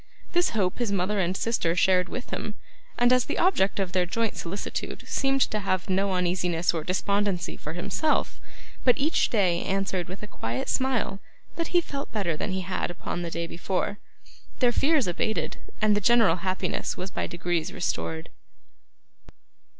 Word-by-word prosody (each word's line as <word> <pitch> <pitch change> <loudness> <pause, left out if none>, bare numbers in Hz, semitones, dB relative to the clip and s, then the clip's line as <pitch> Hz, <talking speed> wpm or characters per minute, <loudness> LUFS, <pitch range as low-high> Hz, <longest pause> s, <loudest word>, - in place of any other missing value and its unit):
This 350 0 +3
hope 185 0 +1
his 235 -4 0
mother 200 +2 +1
and 185 0 +1
sister 195 -8 +1
shared 180 0 +3
with 250 - -6
him; 210 - -3 0.4
and 245 +1 +5
as 255 -2 +4
the - - -3
object 205 - +3
of 190 -2 0
their 180 -1 +1
joint 225 +4 0
solicitude 185 +4 -4
seemed 270 0 +1
to 215 - +2
have 185 -1 -1
no 195 +1 +2
uneasiness 175 -1 +1
or 165 -2 -2
despondency 200 +1 0
for 150 - -6
himself, 305 - 0 0.4
but 250 - +5
each 305 +4 +2
day 185 -6 +2
answered 190 -2 -1
with 185 +3 -8
a - - -5
quiet 120 - -3
smile 250 -7 0 0.4
that 335 -1 -1
he 350 - +3
felt 280 -4 -6
better 190 -7 0
than 180 - -3
he 190 0 -1
had 185 +1 -2
upon 175 0 -4
the 170 - -3
day 170 0 -3
before, 185 +4 -2 0.6
their 245 -2 +4
fears 290 +2 +3
abated, 185 +5 -1 0.3
and 210 -1 +5
the 205 - +1
general 215 -4 +5
happiness 185 +1 -2
was 185 +1 -4
by - - -2
degrees 175 0 -1
restored. 80 - -3
190 Hz, 170 wpm, -27 LUFS, 175-225 Hz, 0.6 s, and